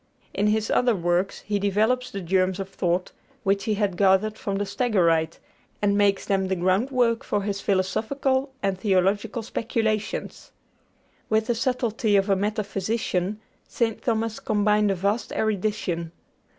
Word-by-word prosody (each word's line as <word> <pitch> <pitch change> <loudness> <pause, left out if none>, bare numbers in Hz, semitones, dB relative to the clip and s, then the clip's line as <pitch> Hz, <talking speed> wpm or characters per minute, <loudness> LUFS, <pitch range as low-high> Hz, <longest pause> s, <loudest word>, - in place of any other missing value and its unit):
In 205 - +1
his 215 +1 +1
other 245 -2 +3
works, 175 +1 0
he 205 -1 -2
develops 220 +6 +1
the 195 - -5
germs 185 +1 +1
of 195 0 -4
thought 180 -1 -1 0.3
which 200 -1 +1
he 215 - +1
had 200 -3 -1
gathered 200 +2 +3
from 200 -2 -3
the 205 - -1
Stagirite, 170 -9 +1 0.4
and 200 -1 +2
makes 200 -1 +2
them 195 -1 +1
the 190 - 0
groundwork 230 +6 +1
of 205 -1 +1
his 200 -1 -3
philosophical 260 +8 0
and 195 -1 0
theological 200 +4 +1
speculations. 220 -2 -2 0.8
With 220 0 +2
the 240 - +1
subtlety 235 -3 0
of 200 +1 +3
a - - +5
metaphysician 205 -1 -2 0.3
St. 225 -2 -1
Thomas 225 -1 -1
combined 210 0 +2
a 195 - +1
vast 200 +5 -1
erudition. 200 -5 -1
205 Hz, 145 wpm, -25 LUFS, 190-220 Hz, 0.8 s, a